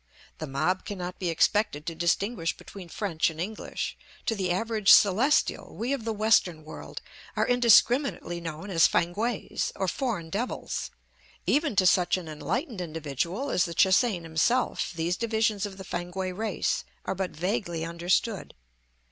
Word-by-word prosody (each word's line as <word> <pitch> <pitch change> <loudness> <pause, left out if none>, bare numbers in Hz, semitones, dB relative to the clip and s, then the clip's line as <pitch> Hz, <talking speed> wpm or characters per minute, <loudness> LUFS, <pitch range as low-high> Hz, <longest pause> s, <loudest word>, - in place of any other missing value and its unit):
The 155 - -4
mob 155 +8 0
cannot 180 -3 -6
be 180 - -1
expected 165 -2 +1
to 165 - -3
distinguish 170 +2 0
between 190 -4 -11
French 170 -4 0
and 160 -1 -10
English; 205 +5 -4 0.3
to - - +1
the 190 -4 -2
average 215 +2 +2
Celestial 215 +9 +4
we 245 +5 -1
of 250 -5 -4
the 225 - 0
Western 210 -7 +2
world 155 - -9 0.3
are - - +2
indiscriminately 245 - +3
known 165 +4 -6
as 165 -3 +6
Fankwaes, 210 +7 -1
or 190 - -1
foreign 195 - -2
devils; 230 +6 -3 0.6
even 290 -5 +1
to 185 - +4
such 180 0 +4
an 180 -3 -7
enlightened 210 - -3
individual 165 - -3
as 180 - +2
the 170 -2 -6
Che 190 - +5
hsein 195 -4 +3
himself 165 +11 +1
these 170 +1 -1
divisions 220 -3 0
of 190 -1 -11
the 190 - -8
Fankwae 180 +2 -3
race 220 +2 -1 0.2
are - - -1
but 190 -1 -2
vaguely 175 -1 -2
understood. 175 +5 -1
190 Hz, 155 wpm, -27 LUFS, 170-220 Hz, 0.6 s, as